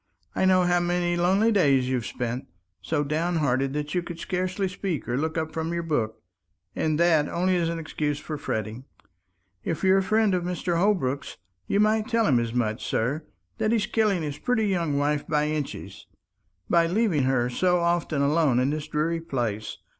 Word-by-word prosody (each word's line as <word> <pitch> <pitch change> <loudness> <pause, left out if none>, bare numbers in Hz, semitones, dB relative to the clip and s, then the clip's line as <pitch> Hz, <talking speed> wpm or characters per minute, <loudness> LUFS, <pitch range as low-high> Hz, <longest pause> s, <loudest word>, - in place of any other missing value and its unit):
I - - +1
know 185 -1 +5
how 175 0 +3
many 175 0 0
lonely 190 +6 +3
days 140 - +3
you've 125 -3 -1
spent, 120 +1 -4 0.3
so 145 - -1
downhearted 150 -4 0
that 150 0 -3
you 180 - +1
could 175 -1 -7
scarcely 185 +2 -1
speak 185 -3 -4
or 120 - -1
look 160 +4 -1
up 160 0 -2
from 160 +1 -3
your 170 0 -2
book, 120 -9 -2 0.5
and 155 -1 0
that 160 -4 +3
only 185 +1 +1
an 170 -1 0
excuse 150 -2 -2
for 155 - -6
fretting. 110 -3 -4 0.8
If 165 - -3
you're 190 0 +5
a - - +1
friend 215 +1 +2
of 180 -1 0
Mr. 175 -1 -1
Holbrook's, 170 -9 0 0.3
you 200 - +1
might 215 +1 +2
tell 230 -2 +2
him 130 -8 +4
as 115 -1 -2
much, 110 -3 -1
sir; 140 +7 -1 0.3
that 215 - +1
he's 225 -2 +2
killing 210 -6 +1
his 145 -1 -4
pretty 245 -3 +1
young 170 -7 0
wife 145 +1 0
by 150 -1 +1
inches, 150 -2 -5 0.6
by 170 -1 +3
leaving 180 - +1
her 130 -2 +2
so 180 +8 +2
often 170 -4 0
alone 145 -3 +3
in 130 +3 +2
this 155 0 -4
dreary 165 +2 -1
place. 120 -9 -3
165 Hz, 185 wpm, -26 LUFS, 140-180 Hz, 0.8 s, know